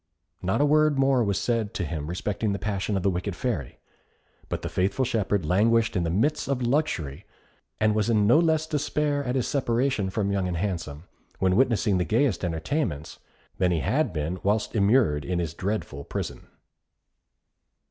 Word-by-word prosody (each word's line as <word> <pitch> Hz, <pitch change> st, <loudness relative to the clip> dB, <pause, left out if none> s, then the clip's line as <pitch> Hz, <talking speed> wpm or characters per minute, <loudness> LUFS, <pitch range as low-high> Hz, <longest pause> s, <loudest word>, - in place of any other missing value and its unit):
Not 95 Hz, +8 st, 0 dB
a -, -, +5 dB
word 155 Hz, 0 st, +3 dB
more 135 Hz, -2 st, +3 dB
was 100 Hz, -3 st, 0 dB
said 115 Hz, -4 st, -1 dB
to 90 Hz, -, -1 dB
him 75 Hz, -2 st, -4 dB
respecting 100 Hz, +4 st, -2 dB
the -, -, -2 dB
passion 100 Hz, -1 st, -2 dB
of 95 Hz, -, -3 dB
the 100 Hz, -, +3 dB
wicked 90 Hz, +1 st, -3 dB
Fairy; 105 Hz, -, -3 dB, 0.7 s
but -, -, -3 dB
the -, -, -2 dB
faithful 100 Hz, +8 st, 0 dB
shepherd 105 Hz, -7 st, 0 dB
languished 110 Hz, +7 st, +2 dB
in 90 Hz, -, +1 dB
the 85 Hz, -, -1 dB
midst 115 Hz, -, 0 dB
of 135 Hz, -2 st, -1 dB
luxury, 120 Hz, -, -1 dB, 0.6 s
and 110 Hz, 0 st, +3 dB
was 105 Hz, +1 st, 0 dB
in 105 Hz, -3 st, +3 dB
no 120 Hz, +9 st, +6 dB
less 160 Hz, -2 st, +2 dB
despair 150 Hz, -1 st, -1 dB
at 125 Hz, -1 st, -2 dB
his 130 Hz, -, 0 dB
separation 125 Hz, -5 st, 0 dB
from 100 Hz, +1 st, -1 dB
Young 95 Hz, -2 st, 0 dB
and 90 Hz, -1 st, -2 dB
Handsome, 85 Hz, -5 st, -3 dB, 0.3 s
when 95 Hz, -1 st, +2 dB
witnessing 110 Hz, -5 st, +2 dB
the -, -, +2 dB
gayest 110 Hz, -, +1 dB
entertainments, 85 Hz, -, -2 dB, 0.4 s
than 90 Hz, -1 st, +3 dB
he 85 Hz, -3 st, 0 dB
had -, -, +1 dB
been 80 Hz, +4 st, -3 dB
whilst 105 Hz, +2 st, 0 dB
immured 100 Hz, -, +3 dB
in 90 Hz, 0 st, -2 dB
his 85 Hz, -3 st, -2 dB
dreadful 90 Hz, -7 st, -3 dB
prison. -, -, -5 dB
105 Hz, 180 wpm, -26 LUFS, 90-125 Hz, 0.7 s, no